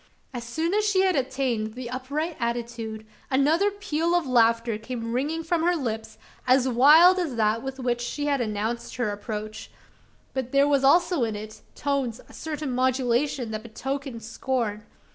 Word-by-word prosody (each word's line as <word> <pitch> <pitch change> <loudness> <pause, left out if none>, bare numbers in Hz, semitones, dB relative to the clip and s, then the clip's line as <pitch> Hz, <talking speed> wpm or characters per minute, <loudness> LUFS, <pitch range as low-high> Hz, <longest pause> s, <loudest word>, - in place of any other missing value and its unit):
As 240 -2 -5
soon 320 +9 -2
as 425 +1 +2
she 410 -3 +3
had 375 -2 +3
attained 255 -5 -1
the 250 -1 -6
upright 285 +6 -3
attitude, 235 -2 -3 0.2
another 305 +9 +3
peal 345 -5 -1
of 350 -3 +2
laughter 230 -3 +2
came 230 0 -5
ringing 300 +6 -1
from 325 0 0
her 350 +2 +2
lips, 225 -7 -4 0.3
as 255 0 +4
wild 305 +9 +7
as 320 -8 -2
that 220 0 +1
with 265 +1 -5
which 240 -1 -1
she 290 +4 -3
had 280 -3 +1
announced 220 +1 -3
her 245 -4 -1
approach; 210 +1 -6 0.6
but 260 -2 -3
there 280 +1 +4
was 280 -2 +2
also 340 +1 +4
in 220 -2 -1
its 215 +1 -8
tones 270 -5 -1
a - - -16
certain 305 -3 -4
modulation 255 0 0
that 215 0 -4
betokened 260 +1 -5
scorn! 225 -2 -3
255 Hz, 165 wpm, -25 LUFS, 230-295 Hz, 0.6 s, wild